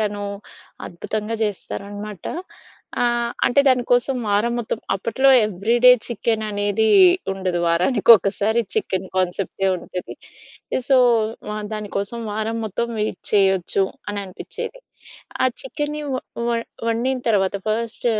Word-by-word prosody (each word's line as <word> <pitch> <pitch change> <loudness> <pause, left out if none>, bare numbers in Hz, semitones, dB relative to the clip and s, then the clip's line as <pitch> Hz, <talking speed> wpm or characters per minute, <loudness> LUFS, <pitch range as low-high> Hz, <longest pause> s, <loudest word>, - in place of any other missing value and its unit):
తను 205 -1 -2 0.6
అద్భుతంగా 215 +5 -4
జేస్తారనమాట. 205 -1 -5 0.8
ఆహ్, 240 0 +1
అంటే 280 +3 +4
దాని 255 -2 +3
కోసం 245 +2 +3
వారం 210 +4 +2
మొత్తం 225 -1 -3 0.2
అప్పట్లో 230 +7 +2 0.2
ఎవ్రీ 210 +4 -1
డే 250 - +11 0.2
చికెన్ 225 -1 -1
అనేది 205 +1 0 0.5
ఉండదు. 185 -2 -2
వారానికి 185 +8 +2
ఒకసారి 205 +4 0
చికెన్ 190 - -1
కాన్సెప్టే 185 +1 -1
ఉంటది. 180 +1 -7 0.7
సో, 270 - +5 0.5
వా 210 - -3 0.2
దానికోసం 210 +1 -3
వారం 220 +2 -2
మొత్తం 220 +3 -2
వెయిట్ 215 - -2
చేయొచ్చు 195 -2 +3 0.3
అని 205 - -4
అనిపిచ్చేది. 190 - -6 0.6
ఆ - - +5 0.2
చికెన్ని 300 -11 -4
వ - - 0 0.3
వ - - 0 0.4
వండిన 245 +3 0
తర్వాత, 195 -3 +2
ఫస్ట్ 230 +2 -2
215 Hz, 120 wpm, -21 LUFS, 195-235 Hz, 0.8 s, డే